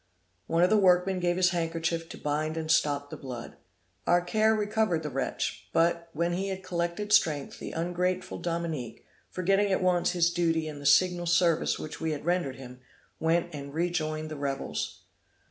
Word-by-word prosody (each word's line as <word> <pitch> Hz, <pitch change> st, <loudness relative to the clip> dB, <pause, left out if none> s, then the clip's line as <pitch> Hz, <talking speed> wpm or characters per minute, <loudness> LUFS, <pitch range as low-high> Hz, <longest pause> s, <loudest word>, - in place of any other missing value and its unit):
One 165 Hz, +1 st, +2 dB
of 180 Hz, -, +4 dB
the 215 Hz, -, +5 dB
workmen 185 Hz, 0 st, +3 dB
gave 175 Hz, 0 st, +1 dB
his 185 Hz, 0 st, +4 dB
handkerchief 165 Hz, -1 st, -2 dB
to -, -, -8 dB
bind 155 Hz, +2 st, -2 dB
and 160 Hz, -1 st, -1 dB
stop 145 Hz, -2 st, +1 dB
the -, -, -6 dB
blood. 125 Hz, -3 st, -7 dB, 0.5 s
Our 175 Hz, 0 st, +4 dB
care 220 Hz, +4 st, +3 dB
recovered 210 Hz, -5 st, 0 dB
the 150 Hz, -, -4 dB
wretch; 135 Hz, 0 st, -3 dB
but, 170 Hz, 0 st, +2 dB
when 170 Hz, +3 st, -1 dB
he 190 Hz, +3 st, -1 dB
had 190 Hz, -1 st, -4 dB
collected 175 Hz, +4 st, -2 dB
strength, 155 Hz, -10 st, +2 dB
the -, -, -6 dB
ungrateful 180 Hz, +2 st, -2 dB
Dominique, 165 Hz, -9 st, -4 dB, 0.2 s
forgetting 195 Hz, +2 st, +1 dB
at 190 Hz, -, +1 dB
once 180 Hz, -1 st, +2 dB
his 170 Hz, -1 st, +3 dB
duty 165 Hz, -2 st, +1 dB
and 145 Hz, -2 st, -7 dB
the 140 Hz, -, -1 dB
signal 175 Hz, +3 st, +4 dB
service 170 Hz, -1 st, +3 dB
which 155 Hz, -, -7 dB
we 160 Hz, -1 st, 0 dB
had 150 Hz, -, -6 dB
rendered 175 Hz, -7 st, 0 dB
him, 125 Hz, -1 st, -11 dB, 0.4 s
went 170 Hz, +1 st, +1 dB
and 140 Hz, 0 st, -7 dB
rejoined 155 Hz, -2 st, -1 dB
the 155 Hz, -, -5 dB
rebels. 140 Hz, -1 st, -3 dB
170 Hz, 180 wpm, -28 LUFS, 155-180 Hz, 0.5 s, the